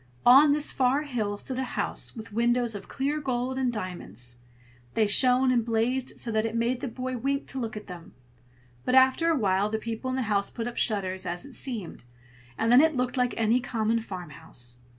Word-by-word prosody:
On 275 +4 +8
this 295 0 +2
far 265 +3 +2
hill 220 -8 -2
stood 260 +5 -5
a - - 0
house - - -2
with 225 -2 -9
windows 240 +1 +1
of 200 -2 -8
clear 285 +3 -2
gold 260 -1 -2
and 255 -2 +1
diamonds. 125 - -5 0.6
They 220 - +3
shone 255 +5 +4
and 240 -2 +2
blazed 235 +3 -1
so 235 - -3
that 220 0 +1
it 225 0 -3
made 235 +2 0
the - - -3
boy 255 +1 -4
wink 275 +3 -1
to 265 - -3
look 225 -3 -4
at 210 - -8
them: 175 -3 -11 0.7
but 255 - +1
after 260 +6 +5
a 330 - +3
while 200 -2 +1
the 220 - -1
people 230 +3 -4
in 255 - -1
the 260 - 0
house 205 -2 0
put 230 - -5
up 240 - -5
shutters, 190 -4 0
as 175 +8 -4
it 280 - -12
seemed, 225 - -4 0.5
and 225 - +1
then 250 +3 +8
it 315 -1 +3
looked 250 0 -1
like 250 -1 0
any 230 +2 +3
common 230 -2 0
farmhouse. 160 - -7
235 Hz, 210 wpm, -27 LUFS, 210-260 Hz, 0.7 s, On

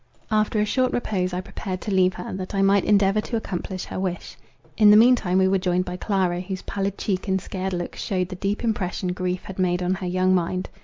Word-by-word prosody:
After 215 0 +2
a 210 - +2
short 255 +4 +1
repose 190 -6 -1
I 180 +1 -2
prepared 185 0 -6
to 210 - -4
leave 185 -1 +3
her, 180 - -6
that 185 +1 -5
I 195 - +2
might 195 0 +3
endeavour 205 0 +3
to 230 - -4
accomplish 185 -3 -4
her - - -5
wish. 185 -2 -4 0.4
In 210 -2 +6
the 210 - +8
mean 245 +3 +7
time 185 -6 -1
we 190 0 +4
were 190 0 +2
joined 180 -1 0
by 180 -1 -5
Clara, 180 -2 0
whose 185 0 -6
pallid 200 0 -3
cheek 190 0 -2
and 190 0 +1
scared 190 0 -4
look 175 -1 -4
shewed 185 -4 -2
the 185 - -6
deep 200 +4 -2
impression 190 -5 -1
grief 180 0 -3
had 190 -1 -9
made 180 -1 +1
on 180 +1 +1
her 190 -1 -4
young 185 +1 +2
mind. 185 +1 -1
190 Hz, 240 wpm, -24 LUFS, 180-200 Hz, 0.4 s, the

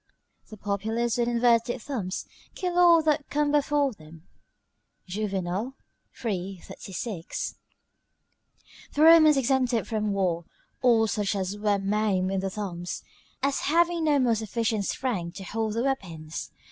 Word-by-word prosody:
["The 215 - -10
populace, 220 +4 -1
with 235 - +2
inverted 240 0 +2
thumbs, 220 -7 -4 0.3
kill 360 -2 -1
all 340 -2 +7
that 300 -2 +1
come 295 0 +1
before 290 -2 +2
them." 155 -3 -15 0.8
Juvenal, 195 +4 -3 0.5
iii. 190 -3 -2
36] 190 -2 -5 1.4
The 295 - +3
Romans 315 -2 +8
exempted 255 -3 +1
from 215 -2 -1
war 180 -4 0 0.4
all 235 -3 +5
such 205 -1 -1
as 190 0 -2
were 205 -1 +1
maimed 195 -1 0
in 195 - 0
the 195 +1 -2
thumbs, 180 -3 -5 0.4
as 275 0 +1
having 340 +1 +3
no 295 -2 +4
more 250 -4 +3
sufficient 220 -1 -1
strength 190 -10 -2
to 195 - -7
hold 220 +2 -2
their 230 - 0
weapons. 170 - -3
220 Hz, 135 wpm, -27 LUFS, 195-270 Hz, 1.4 s, Romans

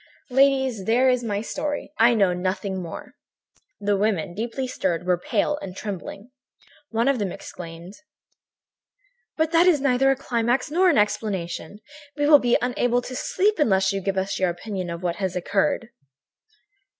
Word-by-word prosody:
"Ladies, 265 -5 +2
there 245 +5 +3
is 250 -1 0
my 205 -3 -2
story. 290 +6 -4
I 235 +1 +6
know 195 -4 +3
nothing 185 +1 -2
more." 170 -2 -8 0.7
The 205 0 +1
women, 195 -4 0
deeply 230 +6 -3
stirred, 180 -8 -2
were 180 -1 +2
pale 295 +10 0
and 190 -1 -8
trembling. 200 +3 -7 0.6
One 230 +2 0
of 275 -3 +2
them 200 -3 -2
exclaimed: 170 +1 -9 1.4
"But 315 0 +1
that 340 +1 +5
is 335 -5 +5
neither 270 -1 +3
a 270 - +3
climax 245 0 -1
nor 365 +3 +4
an 330 - +3
explanation! 205 -3 -2 0.4
We 290 - +1
will 295 -1 +8
be 240 -2 +3
unable 245 0 +1
to 255 - -7
sleep 405 +9 0
unless 195 -7 +3
you 195 - -2
give 195 0 -2
us 190 +1 -1
your 185 -1 +2
opinion 185 +1 -5
of 170 +1 -6
what 175 -1 -1
had 190 -3 -2
occurred." 205 +7 0
220 Hz, 160 wpm, -24 LUFS, 190-260 Hz, 1.4 s, will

